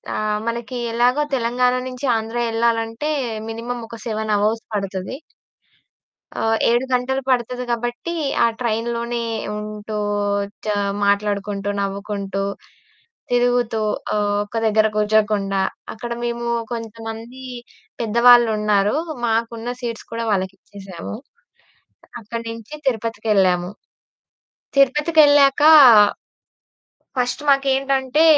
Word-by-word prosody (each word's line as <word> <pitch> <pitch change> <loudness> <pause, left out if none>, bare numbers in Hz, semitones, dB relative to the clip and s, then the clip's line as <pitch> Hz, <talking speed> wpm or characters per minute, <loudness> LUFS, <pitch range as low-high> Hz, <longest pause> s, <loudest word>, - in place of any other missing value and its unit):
ఆహ్, 215 0 0
మనకి 235 +2 -3 0.2
ఎలాగో 250 +5 +3
తెలంగాణ 250 +1 +1
నించి 255 +2 -5
ఆంధ్ర 225 +2 -4
యెళ్ళాలంటే, 230 +4 0 0.4
మినిమమ్ 235 +1 -5
ఒక 230 - -8
7 215 -1 -1
అవర్స్ 220 +2 0
పడతది. 195 +5 -4 1.2
ఆహ్, 225 0 +1
7 240 +2 +2
గంటలు 265 +2 0
పడతది 250 0 0
గాబట్టీ, 240 +7 -3 0.3
ఆ - - +5
ట్రైన్‌లోనే 235 0 -2 0.4
ఉంటూ 210 0 -6 0.7
చ - - -5 0.4
మాట్లాడుకుంటూ, 200 0 0
నవ్వుకుంటూ, 200 0 -3 0.9
తిరుగుతూ 245 -2 +2 0.4
ఆహ్, 205 -1 +1
ఒక 225 +2 -6
దగ్గర 215 0 +3
కూర్చోకుండా. 210 -2 +1 0.3
అక్కడ 235 +2 -7
మేమూ 235 0 -2 0.2
కొంతమందీ 230 +2 -7 0.6
పెద్దవాళ్ళున్నారు. 220 -2 +4 0.3
మాకున్న 230 +1 -1
సీట్స్ 230 -2 -5
కూడా 230 0 -3
వాళ్ళకిచ్చేసాము. 190 -1 -5 1.1
అక్కడి 230 +2 -6
నించి 230 +5 -8
తిరుపతికెళ్ళాము. 205 -6 +1 1.1
తిరుపతికెళ్ళాకా... 290 +1 +5 1.5
ఫస్ట్ 245 +2 -1
మాకేంటంటే, 275 +1 +2
230 Hz, 90 wpm, -21 LUFS, 210-245 Hz, 1.5 s, ఆ